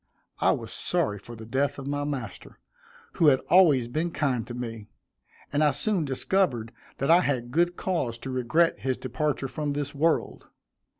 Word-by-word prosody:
I -, -, +4 dB
was -, -, -6 dB
sorry 105 Hz, -1 st, 0 dB
for 120 Hz, +4 st, -9 dB
the 110 Hz, 0 st, -10 dB
death 135 Hz, +5 st, 0 dB
of 135 Hz, -, -7 dB
my 145 Hz, +1 st, -2 dB
master, 130 Hz, -8 st, -6 dB, 0.6 s
who 165 Hz, -, +4 dB
had 135 Hz, -3 st, +6 dB
always 155 Hz, -10 st, +6 dB
been 155 Hz, +8 st, -1 dB
kind 135 Hz, -8 st, -1 dB
to 120 Hz, -, -6 dB
me; 115 Hz, -3 st, -6 dB, 0.7 s
and 145 Hz, +2 st, +3 dB
I 150 Hz, -, +5 dB
soon 160 Hz, +5 st, 0 dB
discovered 135 Hz, -, 0 dB, 0.3 s
that 135 Hz, +4 st, +1 dB
I 175 Hz, +2 st, +7 dB
had 125 Hz, -6 st, -1 dB
good 175 Hz, +4 st, +2 dB
cause 140 Hz, -11 st, -2 dB
to 135 Hz, -, -3 dB
regret 130 Hz, +7 st, +2 dB
his 130 Hz, -1 st, -1 dB
departure 135 Hz, +2 st, -2 dB
from 145 Hz, +2 st, -3 dB
this 145 Hz, 0 st, -3 dB
world. 155 Hz, +3 st, 0 dB
140 Hz, 175 wpm, -27 LUFS, 120-155 Hz, 0.7 s, I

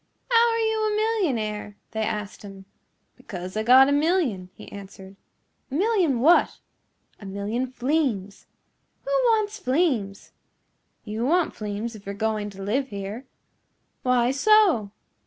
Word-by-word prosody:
"How 470 Hz, 0 st, +5 dB
are -, -, 0 dB
you 445 Hz, -1 st, 0 dB
a 420 Hz, -, -1 dB
millionaire?" 250 Hz, -, -1 dB
they 220 Hz, -, -3 dB
asked 210 Hz, -2 st, -4 dB
him. 195 Hz, -2 st, -11 dB, 0.5 s
"Because 185 Hz, -1 st, -8 dB
I 215 Hz, -, 0 dB
got 255 Hz, +4 st, +7 dB
a -, -, +1 dB
million," 290 Hz, -, +1 dB
he -, -, -12 dB
answered. 195 Hz, -1 st, -11 dB, 0.5 s
"A 270 Hz, -, -5 dB
million 360 Hz, -, +2 dB
what?" 325 Hz, +6 st, +4 dB, 0.6 s
"A 205 Hz, -, -11 dB
million 205 Hz, +6 st, -3 dB
fleems." 250 Hz, -7 st, -2 dB, 0.6 s
"Who -, -, -5 dB
wants 430 Hz, -2 st, +1 dB
fleems?" 255 Hz, -, -1 dB, 0.7 s
"You 220 Hz, +1 st, -4 dB
want 345 Hz, +2 st, +2 dB
fleems 210 Hz, +2 st, -5 dB
if 205 Hz, -2 st, -13 dB
you're 200 Hz, -, -4 dB
going 215 Hz, -1 st, -2 dB
to 195 Hz, -1 st, -9 dB
live 260 Hz, +7 st, -1 dB
here." 205 Hz, +3 st, -7 dB, 0.7 s
"Why 250 Hz, -1 st, +2 dB
so?" 340 Hz, -, +4 dB
240 Hz, 140 wpm, -24 LUFS, 205-335 Hz, 0.7 s, got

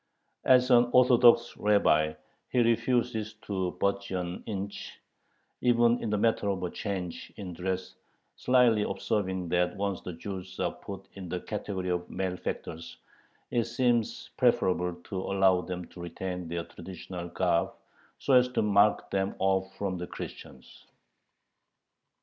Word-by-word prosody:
As 125 Hz, 0 st, +5 dB
an 120 Hz, 0 st, +6 dB
Orthodox 120 Hz, -2 st, +6 dB
rabbi 80 Hz, -7 st, +3 dB, 0.4 s
he -, -, -3 dB
refuses 115 Hz, -2 st, +1 dB
to 95 Hz, -3 st, -2 dB
budge 100 Hz, 0 st, 0 dB
an 90 Hz, -1 st, -3 dB
inch, 100 Hz, -1 st, -5 dB, 0.6 s
even 120 Hz, -1 st, +4 dB
in 115 Hz, -, -2 dB
the 105 Hz, -, +1 dB
matter 105 Hz, -1 st, +1 dB
of 95 Hz, -2 st, -2 dB
a 90 Hz, -, -2 dB
change 95 Hz, -4 st, -5 dB
in 95 Hz, -3 st, -6 dB
dress, 95 Hz, +1 st, -3 dB, 0.4 s
slyly 125 Hz, -4 st, +4 dB
observing 95 Hz, -4 st, -1 dB
that 90 Hz, 0 st, +1 dB
once 100 Hz, -2 st, -2 dB
the 90 Hz, -, -6 dB
Jews 95 Hz, +2 st, -7 dB
are -, -, +1 dB
put 95 Hz, -1 st, -9 dB
in 95 Hz, -3 st, -8 dB
the 90 Hz, +1 st, -2 dB
category 100 Hz, -3 st, -4 dB
of 90 Hz, 0 st, -2 dB
malefactors, 90 Hz, -3 st, -4 dB, 0.5 s
it 120 Hz, -2 st, +1 dB
seems 120 Hz, -1 st, 0 dB
preferable 90 Hz, -1 st, +2 dB
to 95 Hz, -, -4 dB
allow 95 Hz, -2 st, +3 dB
them 90 Hz, -1 st, -5 dB
to 90 Hz, -, -11 dB
retain 90 Hz, +1 st, -5 dB
their 85 Hz, 0 st, -3 dB
traditional 90 Hz, 0 st, -8 dB
garb, 85 Hz, -1 st, +1 dB, 0.5 s
so 140 Hz, -, 0 dB
as 125 Hz, 0 st, +6 dB
to -, -, +2 dB
mark 105 Hz, 0 st, +3 dB
them 95 Hz, 0 st, 0 dB
off 95 Hz, 0 st, +1 dB
from 95 Hz, -3 st, -2 dB
the 90 Hz, -, -5 dB
Christians. 65 Hz, -, -10 dB
95 Hz, 140 wpm, -29 LUFS, 90-110 Hz, 0.6 s, an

